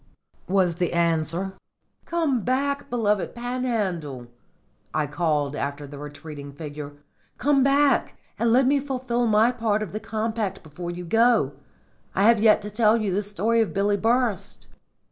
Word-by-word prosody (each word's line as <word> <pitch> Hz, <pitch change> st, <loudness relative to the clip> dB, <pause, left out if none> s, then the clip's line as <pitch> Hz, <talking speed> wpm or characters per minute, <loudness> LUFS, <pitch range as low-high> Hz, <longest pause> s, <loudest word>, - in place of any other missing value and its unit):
was 185 Hz, -3 st, +2 dB
the 175 Hz, -1 st, -1 dB
answer. 170 Hz, +2 st, 0 dB, 0.5 s
"Come 315 Hz, -8 st, 0 dB
back, 280 Hz, +4 st, -1 dB
beloved 210 Hz, -5 st, 0 dB
Panhandle!" 215 Hz, -, -2 dB, 0.7 s
I 155 Hz, -, +2 dB
called 150 Hz, -1 st, -1 dB
after 145 Hz, +1 st, -4 dB
the 140 Hz, 0 st, -10 dB
retreating 145 Hz, -1 st, -9 dB
figure. 145 Hz, -1 st, -7 dB, 0.4 s
"Come 280 Hz, 0 st, +3 dB
back 280 Hz, +1 st, +3 dB, 0.2 s
and 230 Hz, -1 st, +2 dB
let 255 Hz, +3 st, +5 dB
me 280 Hz, +2 st, +3 dB
fulfil 255 Hz, -3 st, -1 dB
my 220 Hz, +2 st, +4 dB
part 220 Hz, -3 st, 0 dB
of 205 Hz, -, -7 dB
the 215 Hz, -, -4 dB
compact 220 Hz, -2 st, -3 dB
before 165 Hz, +3 st, -7 dB
you 175 Hz, 0 st, -6 dB
go. 225 Hz, -, +3 dB, 0.6 s
I 195 Hz, -, +2 dB
have 230 Hz, +1 st, +6 dB
yet 215 Hz, -1 st, +5 dB
to 210 Hz, -, -6 dB
tell 215 Hz, +1 st, +4 dB
you 210 Hz, -4 st, -1 dB
the 200 Hz, -, +1 dB
story 210 Hz, +3 st, +1 dB
of 220 Hz, -, -2 dB
Billy 200 Hz, +1 st, +2 dB
Burst." 220 Hz, -3 st, 0 dB
210 Hz, 150 wpm, -24 LUFS, 170-235 Hz, 0.7 s, have